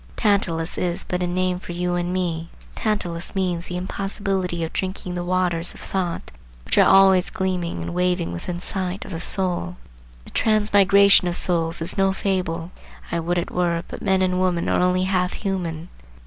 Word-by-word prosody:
Tantalus 180 -6 0
is 175 -1 +1
but 180 0 -3
a 180 - 0
name 180 0 0
for 180 - -8
you 175 +1 -1
and 175 0 -1
me. 170 -3 -2 0.2
Tantalus 180 -6 -1
means 180 -3 -1
the 180 - -4
impossibility 190 -2 -2
of 160 - -5
drinking 185 -1 -3
the 175 0 -3
waters 175 -1 0
of - - -12
thought 180 -3 -3 0.3
which - - +1
are - - +6
always 190 -1 +6
gleaming 180 -2 -2
and - - -5
waving 180 - 0
within 175 - -5
sight 185 0 -2
of - - -9
the 165 -1 -5
soul. 180 -2 0 0.5
The - - -12
transmigration 200 -3 +4
of 175 - +1
souls 165 -2 +2
is 185 +4 -2
no 195 0 +3
fable. 180 -3 -2 0.4
I 170 - 0
would 175 +2 -1
it 175 - -2
were; 170 -1 0
but - - -8
men 190 -2 +2
and 185 0 +1
women 180 -2 0
are - - +2
only 180 0 +2
half 185 -1 0
human. 175 -4 -4
180 Hz, 180 wpm, -22 LUFS, 175-190 Hz, 0.5 s, are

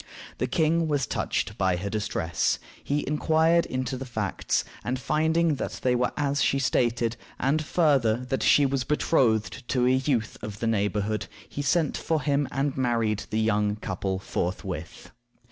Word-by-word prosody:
The 125 - 0
king 160 +4 +2
was 145 -4 +1
touched 105 -1 -2
by 95 -2 +2
her 95 +3 -3
distress. 100 -5 0 0.3
He 145 +1 -1
inquired 160 +3 +3
into 130 0 -2
the 135 - -6
facts, 105 -6 -1 0.2
and, 125 +2 -1
finding 160 +4 +2
that - - -3
they 125 - +3
were 125 0 +1
as 145 -1 0
she 140 - +2
stated, 120 -3 +1 0.2
and, 150 +4 +1
farther, 140 -9 +3
that 135 - 0
she 145 - +5
was 135 -1 0
betrothed 125 -5 +1
to 125 -2 +1
a 125 - +4
youth 130 -4 0
of 105 -1 -6
the - - -2
neighborhood, 105 -1 0 0.2
he 145 - -5
sent 160 +1 +1
for 160 -2 -1
him 145 -1 +1
and 135 +1 -1
married 115 -5 0
the 110 - 0
young 105 -1 +1
couple 95 -2 -3
forthwith. 90 -3 -4
125 Hz, 160 wpm, -26 LUFS, 110-145 Hz, 0.3 s, she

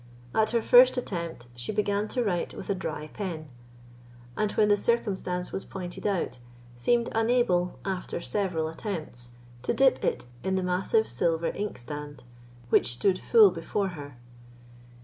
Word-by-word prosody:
At 220 0 +3
her 235 -1 +1
first 255 +1 +7
attempt, 170 - -4
she 120 0 -5
began 205 0 0
to 245 +2 -1
write 180 -6 -1
with - - -4
a - - +3
dry 155 -5 -5
pen, 165 -7 -5 0.9
and 215 -1 0
when 210 - +3
the 205 - +5
circumstance 195 -5 -1
was 195 - -4
pointed 180 +1 -5
out, 175 -11 -1 0.4
seemed 235 - +1
unable, 225 -6 +2
after 190 -3 -3
several 175 -4 -1
attempts, 160 - -6 0.3
to 125 - -1
dip 270 0 +4
it - - 0 0.2
in 190 - 0
the 190 - 0
massive 185 +5 +1
silver 165 +7 0
ink 210 +1 -3
standish, 145 +2 -8 0.4
which 120 - +3
stood 185 +9 +1
full 220 -5 +6
before 185 +3 -2
her. 145 -7 -9
185 Hz, 150 wpm, -28 LUFS, 160-210 Hz, 0.9 s, first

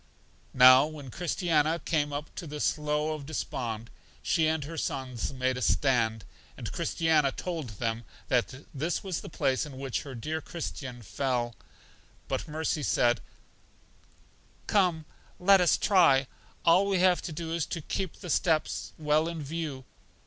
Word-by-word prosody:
Now 130 +2 +8
when 145 -4 -9
Christiana 165 -1 +1
came 150 -3 -1
up 145 +2 -5
to 170 - -7
the 150 0 -6
Slough 150 +1 0
Of 145 -3 -7
Despond, 115 -7 -4 0.3
she 160 -3 +2
and 160 -1 0
her 160 +4 -7
sons 130 -6 -3
made 130 -1 -1
a - - -4
stand, 115 -4 +2 0.3
and - - -6
Christiana 155 -4 +2
told 155 - -5
them 115 +1 -2 0.2
that 130 +2 0
this 155 +5 -2
was 190 -4 -3
the - - -9
place 135 -4 0
in 145 -4 -8
which 135 -2 -2
her 135 -3 -8
dear 155 +7 -3
Christian 135 -7 -6
fell. 120 +2 -1 0.7
But - - -2
Mercy 155 +1 -1
said, 120 -3 +2 1.4
Come, 180 -6 +2 0.3
let 195 +1 +6
us 175 - +4
try; 165 -9 +4 0.4
all 180 +4 +5
we 195 -1 +2
have 180 -1 +4
to - - -5
do 160 +1 -4
is 165 -3 -1
to 170 - -4
keep 185 +3 -4
the 180 - -4
steps 160 -1 0
well 155 +1 +2
in 165 -2 -4
view. 145 -3 -5
150 Hz, 155 wpm, -29 LUFS, 130-165 Hz, 1.4 s, Now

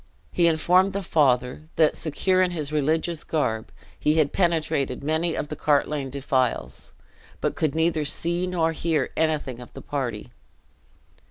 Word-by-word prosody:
He 170 -1 +3
informed 180 +4 +3
the 200 0 -3
father 135 -1 +1
that, 155 -2 +3
secure 185 +4 +1
in 185 - +3
his 155 -4 -3
religious 155 +2 0
garb, 110 -8 -2 0.3
he 150 +1 +2
had 155 -3 +2
penetrated 155 -8 0
many 160 +3 0
of 150 - -4
the 150 - -4
Cartlane 145 -1 0
defiles, 130 -2 -1 0.5
but - - -1
could 155 -2 -1
neither 160 -1 +1
see 170 +4 0
nor 165 -3 +1
hear 160 -3 -1
anything 155 -6 -1
of 125 - -11
the - - -9
party. 125 -7 -4
155 Hz, 150 wpm, -24 LUFS, 140-165 Hz, 0.5 s, He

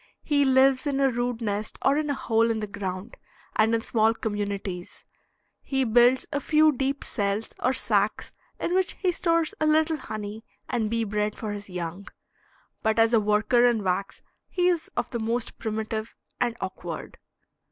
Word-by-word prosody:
He 285 -2 +2
lives 265 +1 +4
in 275 -1 0
a 270 -1 +3
rude 240 0 -2
nest 210 -1 -3
or 275 - +4
in 300 0 0
a 285 - +1
hole 230 -3 +2
in 225 -1 0
the 215 - -2
ground, 200 +1 -6 0.4
and 220 +1 +3
in 225 - 0
small 225 0 +2
communities; 200 -5 -4 0.6
he 270 -1 0
builds 245 +2 +4
a 285 - +1
few 310 +2 +4
deep 275 +1 -2
cells 205 0 -2
or 255 - +3
sacks 210 -5 0 0.3
in 345 - -1
which 375 0 +2
he 370 -2 0
stores 335 -2 +1
a 310 - +3
little 315 +1 +3
honey 215 -4 -6 0.2
and 220 -3 -1
bee 230 0 0
bread 210 0 -1
for 215 -2 -4
his 205 -1 -7
young, 180 +2 -5 0.7
but 220 -1 +1
as 225 +1 +4
a 230 - +6
worker 210 +3 +3
in 240 -4 +3
wax 190 +1 -2 0.3
he 360 0 +2
is 345 -3 -1
of - - -1
the 235 - -2
most 230 +2 -2
primitive 220 0 -3 0.2
and 240 -1 0
awkward. 175 -3 -6
225 Hz, 175 wpm, -26 LUFS, 210-270 Hz, 0.7 s, a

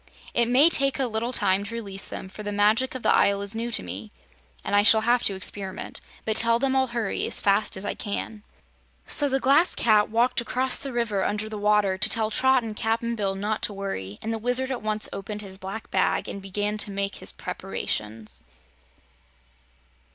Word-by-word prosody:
It 235 -1 +2
may 260 +6 +6
take 275 -5 +3
a 270 - +1
little 230 +1 -2
time 200 -4 +1
to 215 +3 -7
release 200 -4 -4
them, - - -7
for 195 - -10
the 205 0 -4
Magic 215 +6 +2
of 260 - -6
the - - +4
Isle 200 0 +2
is 200 +1 -2
new 230 +1 -3
to 235 - -1
me 95 +4 -7 0.6
and - - 0
I 205 - +6
shall 220 +1 +6
have 240 +2 +2
to 195 - +1
experiment. 190 0 -6 0.2
But 220 -1 0
tell 230 0 +5
them 265 +2 0
I'll 265 0 +2
hurry 235 -4 -2
as - - +2
fast 200 0 +1
as 190 - -6
I - - -2
can." 210 +1 -5 0.6
So 290 -1 +3
the 270 0 +1
Glass 285 +7 +4
Cat 215 -2 +3
walked 235 +3 +1
across 255 +2 +1
the 275 - -6
river 230 -5 -1
under 210 +1 -2
the 215 0 -6
water 205 -2 +2
to - - +3
tell 220 -1 +1
Trot 260 +2 +3
and 220 -2 -6
Cap'n 230 +2 -1
Bill 200 -3 -2
not 210 +2 -2
to 210 - +1
worry, 105 - -5
and 225 - -2
the 225 - -3
Wizard 250 +3 +1
at 255 - -3
once 215 0 -1
opened 210 +2 -6
his 190 -1 -6
black 195 +4 -7
bag 160 -4 +1
and 200 - -6
began 205 +2 -3
to 205 - +3
make 200 0 -3
his - - +1
preparations. 105 +1 -5
215 Hz, 210 wpm, -25 LUFS, 200-235 Hz, 0.6 s, may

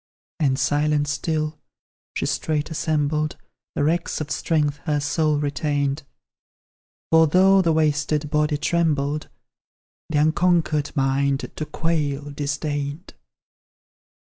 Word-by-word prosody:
And 135 -4 +2
silent 145 +1 +1
still, 155 +1 -2 0.6
she - - -1
straight 155 0 -1
assembled 155 -1 0 0.4
The - - 0
wrecks 165 +3 0
of 155 -2 -5
strength 150 -3 0
her 150 -1 +1
soul 150 +1 +1
retained; 145 -1 -1 1.1
For 160 0 +6
though 190 +4 +5
the 170 -3 +2
wasted 150 -1 +1
body 150 -1 +2
trembled, 150 -2 0 0.8
The 155 - 0
unconquered 155 -1 +2
mind, 135 0 0
to 155 - -3
quail, 145 -3 -1
disdained. 145 +2 -3
150 Hz, 105 wpm, -23 LUFS, 145-160 Hz, 1.1 s, For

